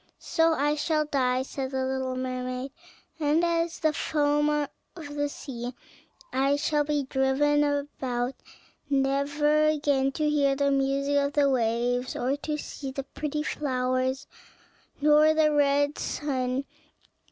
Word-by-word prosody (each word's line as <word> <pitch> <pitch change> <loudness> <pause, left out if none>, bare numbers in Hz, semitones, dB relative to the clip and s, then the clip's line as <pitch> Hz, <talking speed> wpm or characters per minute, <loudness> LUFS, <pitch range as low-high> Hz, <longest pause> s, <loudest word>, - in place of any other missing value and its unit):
"So 325 -1 +2
I 295 +1 +1
shall 305 0 0
die," 255 -3 +1
said 265 0 -4
the 265 -1 -1
little 260 -1 -2
mermaid, 255 +1 -4 0.5
"and 305 +2 +2
as 335 0 0
the 310 -1 +2
foam 295 0 +1
of 295 -1 0 0.4
the 290 0 -1
sea 245 -3 -7 0.6
I 275 +2 +2
shall 295 0 +1
be 295 -1 0
driven 275 +2 +2
about 270 -4 -2 0.6
never 285 +2 +2
again 285 -3 +1
to 305 +1 0
hear 285 -2 +2
the 280 0 +1
music 275 +1 +1
of 280 0 +1
the 285 -2 +3
waves, 245 +1 0
or 260 +3 0
to 300 +1 -3
see 280 -2 -6
the 270 +1 -4
pretty 300 +2 -4
flowers 260 -1 -1 0.7
nor 300 +1 +5
the 310 -1 +4
red 285 0 +2
sun. 265 -2 -2
280 Hz, 135 wpm, -27 LUFS, 265-295 Hz, 0.7 s, nor